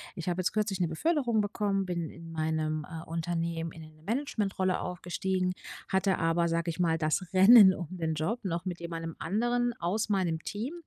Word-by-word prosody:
ich 170 - -6
habe 180 +1 0
jetzt - - 0
kürzlich 210 -3 -1
'ne 170 - +1
Beförderung 245 - +1
bekommen, 205 -1 0
bin 170 -3 -3
in 165 0 -11
meinem, 155 -1 -1
äh, 160 0 -7
Unternehmen, 165 0 -2
in 160 - -11
'ne 155 0 -16
Management-Rolle 205 - -1
aufgestiegen, 180 +1 -2 0.3
hatte 190 0 +1
aber, 165 +1 +2
sage 170 +1 0
ich 160 - -8
mal, 165 -2 +2
dass 155 +4 0
Rennen 195 +1 +9
um 175 -4 -5
den 160 -3 -2
Job 200 +11 -2
noch 170 -1 -3
mit 175 -2 -4
jemanden 165 -1 -5
anderen 240 +6 0
aus 200 +6 -1
meinem 180 -5 +1
Team. 230 +9 -4
175 Hz, 180 wpm, -29 LUFS, 165-200 Hz, 0.3 s, Rennen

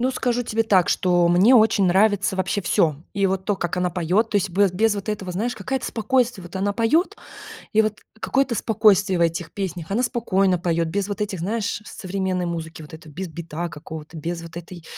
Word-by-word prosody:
Ну, 260 +2 +1
скажу 245 -1 -1
тебе 225 0 0
так, 190 -5 +3
что 175 -1 +2
мне 185 +9 +6
очень 215 -3 +4
нравится 195 +1 +2
вообще 190 +2 -1
всё. 155 -4 +1
И 200 0 +2
вот 190 0 -1
то, 205 - +1
как 175 0 -3
она 180 0 0
поет, 180 +6 +1
то - - +1
есть 200 -1 +1
бе 195 +2 +3
без 215 +3 +2
вот 200 +1 -6
этого, 195 -4 -3
знаешь, 225 +7 -2
какая-то 255 +6 -3
спокойствие. 235 -2 0
Вот 175 - -12
она 195 +2 0
поет, 235 - +1 0.6
и 215 - +4
вот 215 -1 -1 0.2
какое-то 270 -1 0
спокойствие 205 -4 +3
в - - +5
этих 165 0 -1
песнях. 180 -5 -5
Она 230 +5 +1
спокойно 195 -7 +1
поет, 170 -1 0
без 200 +3 -1
вот 205 -1 -5
этих, 205 -3 -2
знаешь, 210 +5 -2
современной 185 -1 -3
музыки. 165 -1 -5
Вот 150 - -13
это, 160 0 -11
без 180 +5 -6
бита 170 +1 -5
какого-то 155 +1 -9
без 165 +2 -4
вот 165 0 -11
этой, 170 -1 -9
190 Hz, 210 wpm, -22 LUFS, 175-215 Hz, 0.6 s, мне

